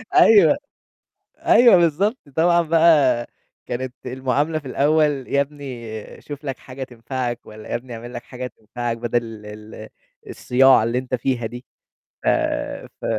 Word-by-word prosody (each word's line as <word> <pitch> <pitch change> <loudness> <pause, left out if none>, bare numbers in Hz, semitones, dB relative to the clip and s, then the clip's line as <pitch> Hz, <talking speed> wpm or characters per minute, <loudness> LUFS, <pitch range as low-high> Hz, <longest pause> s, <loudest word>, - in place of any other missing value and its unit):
أيوه، 225 +6 +6 0.8
أيوه، 240 -5 +6
بالضبط، 180 - +2 0.2
طبعًا 170 +1 +4
بقى 155 -7 +4 0.4
كانت 125 +1 -4
المعاملة 135 +5 -1
في 145 - -13
الأول: 145 -1 +1
"يا 140 - +2
ابني 130 -7 -7
شوف 145 0 -9
لك 135 -2 -4
حاجة 130 0 -8
تنفعك، 120 0 -5
والّا 110 0 -11
يا - - -3
ابني 120 0 -9
اعمل 120 +2 -9
لك 120 - -6
حاجة 125 +1 -7
تنفعك، 120 0 -5
بدل 115 -2 -3
ال 105 +1 -10 0.4
الصياعة 130 -2 +4
اللي 115 +2 0
أنت 130 0 -4
فيها 125 -1 -1
دي." 120 +2 -8 0.6
ف - - +1 0.7
ف - - -10
130 Hz, 140 wpm, -21 LUFS, 120-150 Hz, 0.8 s, أيوه